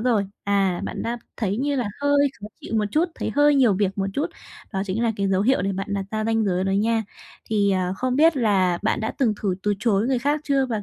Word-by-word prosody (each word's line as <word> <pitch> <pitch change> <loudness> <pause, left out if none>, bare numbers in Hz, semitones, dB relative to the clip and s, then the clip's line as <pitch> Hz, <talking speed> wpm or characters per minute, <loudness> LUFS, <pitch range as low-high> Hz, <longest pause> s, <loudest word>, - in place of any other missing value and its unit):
rồi, 220 -5 +1 0.2
à, 195 -3 +1
bạn - - -4
đã 235 +1 -3 0.2
thấy 205 -3 -1
như 280 +2 0
là 245 - 0 0.2
hơi 285 0 +3
khó 205 - -7
chịu - - -6
một 210 - +2
chút, 315 +7 +2
thấy - - -3
hơi 290 0 +5
nhiều 255 -6 +4
việc 195 0 -1
một 195 - 0
chút, 290 - 0 0.5
đó 190 -1 -1
chính 205 +5 -1
là 230 -1 +2
cái 200 -1 0
dấu 190 0 +2
hiệu 255 -4 +2
để 195 - 0
bạn 195 +1 -4
đặt 195 -1 -2
ra 215 0 -2
ranh 225 -1 +1
giới 185 -1 0
đó 195 - 0
nha. 220 +3 +1 0.5
Thì, 205 -2 +2
à, 185 -1 0
không 255 0 -1
biết 320 0 +5
là 190 -7 +2
bạn 215 - 0
đã 220 - -2
từng 230 -6 +2
thử 190 -3 +1
từ 205 0 +1
chối 220 -1 +1
người 260 -2 +1
khác 290 +4 0
chưa, 275 -2 +2
và 220 -4 -3
215 Hz, 260 wpm, -23 LUFS, 195-255 Hz, 0.5 s, hơi